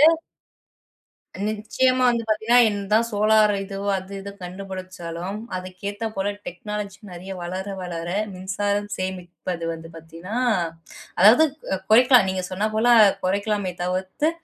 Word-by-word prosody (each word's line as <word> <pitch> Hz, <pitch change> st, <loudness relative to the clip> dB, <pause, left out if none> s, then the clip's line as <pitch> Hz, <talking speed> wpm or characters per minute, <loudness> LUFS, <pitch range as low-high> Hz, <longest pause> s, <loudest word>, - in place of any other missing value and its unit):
வந்து 325 Hz, -, -15 dB, 1.3 s
நிச்சயமா 255 Hz, +4 st, +1 dB
வந்து 235 Hz, -1 st, 0 dB
பார்த்தீங்கன்னா, 220 Hz, +3 st, +3 dB
என்ன 205 Hz, -1 st, -3 dB
தான் 230 Hz, +2 st, +4 dB
சோலார் 215 Hz, 0 st, +4 dB
இது 195 Hz, 0 st, -7 dB, 0.2 s
அது 190 Hz, +1 st, -7 dB
இது 200 Hz, +1 st, -7 dB
கண்டுபிடிச்சாலும், 185 Hz, 0 st, -6 dB, 0.2 s
அதுக்கு 185 Hz, 0 st, -8 dB
ஏத்த 205 Hz, +2 st, -6 dB
போல 195 Hz, +1 st, 0 dB, 0.2 s
டெக்னாலஜி 205 Hz, +2 st, -5 dB
நிறைய 185 Hz, +2 st, -7 dB
வளர 185 Hz, +3 st, -4 dB, 0.2 s
வளர 170 Hz, -2 st, -5 dB, 0.3 s
மின்சாரம் 205 Hz, +2 st, -2 dB
சேமிப்பது 180 Hz, -2 st, -5 dB
வந்து 165 Hz, 0 st, -9 dB
பார்த்தீங்கனா, 165 Hz, +6 st, -8 dB, 0.8 s
அதாவது 225 Hz, -, +8 dB, 0.5 s
குறைக்கலாம். 245 Hz, -1 st, +7 dB
நீங்க 185 Hz, -1 st, -3 dB
சொன்னா 200 Hz, +4 st, 0 dB
போல 230 Hz, +3 st, +3 dB, 0.4 s
குறைக்கலாமே 200 Hz, 0 st, 0 dB
தவிர்த்து, 185 Hz, -, -1 dB
195 Hz, 120 wpm, -23 LUFS, 185-215 Hz, 1.3 s, அதாவது